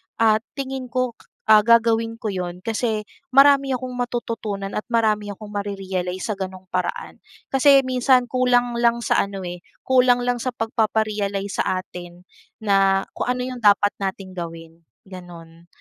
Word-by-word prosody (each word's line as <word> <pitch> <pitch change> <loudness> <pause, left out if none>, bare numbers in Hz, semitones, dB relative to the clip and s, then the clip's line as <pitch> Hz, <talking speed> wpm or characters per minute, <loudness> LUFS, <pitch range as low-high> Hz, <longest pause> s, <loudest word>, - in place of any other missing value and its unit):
ah, 220 -1 +3 0.2
tingin 265 -2 -5
ko, 255 0 0 0.4
ah, 215 - +9
gagawin 230 0 +3
ko 220 -2 -4
'yon 180 -1 -5
kasi 220 0 -1 0.3
marami 275 -1 +6
akong 255 0 -5
matututunan 225 -5 -3
at 210 - -2
marami 220 -3 +1
akong 210 +1 -10
mare-realize 190 -3 -4
sa 210 - -2
ganung 185 -1 -6
paraan. 180 -1 -3 0.3
Kasi 275 0 +5
minsan 255 0 +2
kulang 245 -1 +2
lang 235 0 +2
sa - - +2
ano, 195 -1 -7
eh, 175 0 -6 0.2
kulang 250 -1 +3
lang 245 0 0
sa 255 +2 -2
pagpapa-realize 215 -3 -1
sa 185 - -1
atin 175 -1 -11 0.4
na 195 -1 +3
kung - - -3
ano 250 0 -2
yung 250 -1 -6
dapat 205 0 +5
nating 195 -1 -4
gawin, 165 -1 -8 0.3
gano'n. 170 -2 -12
215 Hz, 150 wpm, -22 LUFS, 190-245 Hz, 0.4 s, ah